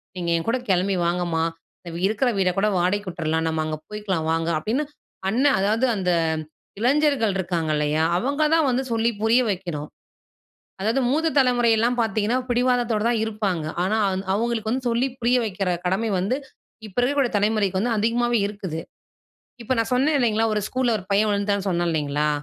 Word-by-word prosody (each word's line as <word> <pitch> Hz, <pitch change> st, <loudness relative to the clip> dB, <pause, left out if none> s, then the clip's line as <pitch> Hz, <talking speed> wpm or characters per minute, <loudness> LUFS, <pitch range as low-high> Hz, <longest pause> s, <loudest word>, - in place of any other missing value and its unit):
நீங்க 175 Hz, -2 st, -3 dB
என்கூட 225 Hz, +9 st, 0 dB
கிளம்பி 190 Hz, +1 st, +2 dB
வாங்கம்மா! 170 Hz, -1 st, 0 dB, 0.4 s
அ -, -, -4 dB, 0.2 s
இருக்கிற 220 Hz, +5 st, +1 dB
வீட 185 Hz, -1 st, +3 dB
கூட 200 Hz, +2 st, +2 dB
வாடகைக்கு 185 Hz, +3 st, 0 dB
விட்டுர்லாம், 160 Hz, -1 st, -1 dB
நம்ம 160 Hz, -1 st, -1 dB
அங்க 155 Hz, 0 st, -2 dB
போயிக்கலாம் 200 Hz, -6 st, -3 dB
வாங்க 165 Hz, 0 st, 0 dB
அப்பிடின்னு 230 Hz, -, -1 dB, 0.4 s
அண்ணன் 265 Hz, +6 st, +3 dB
அதாவது 215 Hz, +6 st, +2 dB
அந்த 185 Hz, -3 st, 0 dB, 0.7 s
இளைஞர்கள் 265 Hz, -3 st, +2 dB
இருக்காங்க 170 Hz, -4 st, -1 dB
இல்லயா! 150 Hz, +1 st, +1 dB
அவுங்க 280 Hz, -, 0 dB
தான் 320 Hz, -3 st, +3 dB
வந்து 255 Hz, +1 st, 0 dB
சொல்லி 230 Hz, 0 st, +2 dB
புரிய 225 Hz, +3 st, +4 dB
வைக்கணும். 175 Hz, -6 st, -4 dB, 0.9 s
அதாவது 225 Hz, +7 st, +1 dB
மூத்த 315 Hz, +4 st, +2 dB
தலைமுறையெல்லாம் 240 Hz, -2 st, +3 dB
பார்த்தீங்கன்னா 220 Hz, +2 st, +1 dB
பிடிவாதத்தோட 245 Hz, -3 st, +1 dB
தான் 235 Hz, -2 st, +1 dB
இருப்பாங்க, 205 Hz, -7 st, -2 dB, 0.2 s
ஆனா 195 Hz, +4 st, +1 dB, 0.4 s
அவுங்களுக்கு 225 Hz, 0 st, -1 dB
வந்து 255 Hz, +1 st, -2 dB
சொல்லி 240 Hz, +3 st, +1 dB
புரிய 240 Hz, +2 st, +3 dB
வைக்கிற 195 Hz, -3 st, -2 dB
கடமை 190 Hz, +5 st, 0 dB
வந்து, 195 Hz, +8 st, 0 dB, 0.5 s
இப்போ 200 Hz, -, -11 dB
இருக்கக்கூடிய 270 Hz, 0 st, +1 dB
தலைமுறைக்கு 205 Hz, -2 st, +1 dB
வந்து 235 Hz, +2 st, 0 dB
அதிகமாவே 235 Hz, +2 st, +1 dB
இருக்குது. 190 Hz, -6 st, -5 dB, 0.8 s
இப்போ 245 Hz, -, -1 dB
நான் 225 Hz, +1 st, 0 dB
சொன்னேன் 285 Hz, +4 st, +2 dB
இல்லேங்களா, 225 Hz, -3 st, +2 dB
ஒரு 210 Hz, -, 0 dB
ஸ்கூல்ல 255 Hz, -2 st, 0 dB
ஒரு 185 Hz, -, -10 dB
பையன் 210 Hz, +2 st, +3 dB
விழுந்துட்டான்னு 200 Hz, -1 st, 0 dB
சொன்னேன் 175 Hz, -1 st, 0 dB
இல்லேங்களா. 150 Hz, -1 st, 0 dB
215 Hz, 160 wpm, -23 LUFS, 180-240 Hz, 0.9 s, புரிய